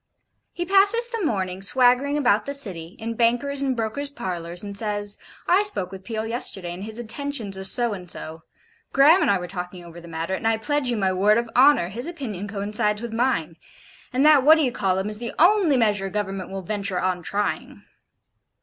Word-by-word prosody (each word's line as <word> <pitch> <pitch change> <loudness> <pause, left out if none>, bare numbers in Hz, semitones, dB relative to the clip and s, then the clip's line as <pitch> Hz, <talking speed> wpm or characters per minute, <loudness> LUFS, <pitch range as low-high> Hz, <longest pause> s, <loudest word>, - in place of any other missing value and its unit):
He 350 - -4
passes 400 +5 +4
the 460 -4 -4
morning 190 - -2
swaggering 255 +6 +3
about 245 -6 +2
the 280 - 0
City, 185 -10 -3
in 230 +1 -4
bankers' 245 +5 +1
and 270 -2 0
brokers 230 +6 -2
parlours, 175 - -3
and 200 -1 -7
says: 205 -1 0 0.3
'I 370 +3 +4
spoke 195 - -3
with 190 -1 -10
Peel 220 0 -4
yesterday, 195 -6 -4
and 180 +2 -8
his 220 +1 -6
intentions 240 -3 -3
are 190 - -6
so 235 +3 +2
and 180 -3 -9
so. 160 -1 -6 0.5
Graham 300 +7 +6
and - - +2
I 200 - +3
were 180 -1 -6
talking 180 -1 -7
over 170 0 -11
the 170 - -13
matter, 165 +2 -4
and 190 - -2
I 225 0 +2
pledge 290 +3 -1
you 240 - -1
my 190 -2 +1
word 205 +4 +3
of 235 -1 -2
honour, 260 -9 +5
his 235 - -3
opinion 230 - -6
coincides 210 +1 -1
with 235 -1 -5
mine; 225 -10 -1 0.5
and 260 +3 +1
that 305 -2 +7
What 305 +4 +7
d'ye 295 -6 +1
call 190 -4 0
um 190 +2 -2
is 210 0 -3
the 235 -1 -5
only 350 -4 +4
measure 205 -4 +1
Government 195 -2 -4
will 195 0 -6
venture 200 -1 -2
on 185 -1 -1
trying.' 205 +4 -3
215 Hz, 205 wpm, -23 LUFS, 190-270 Hz, 0.5 s, that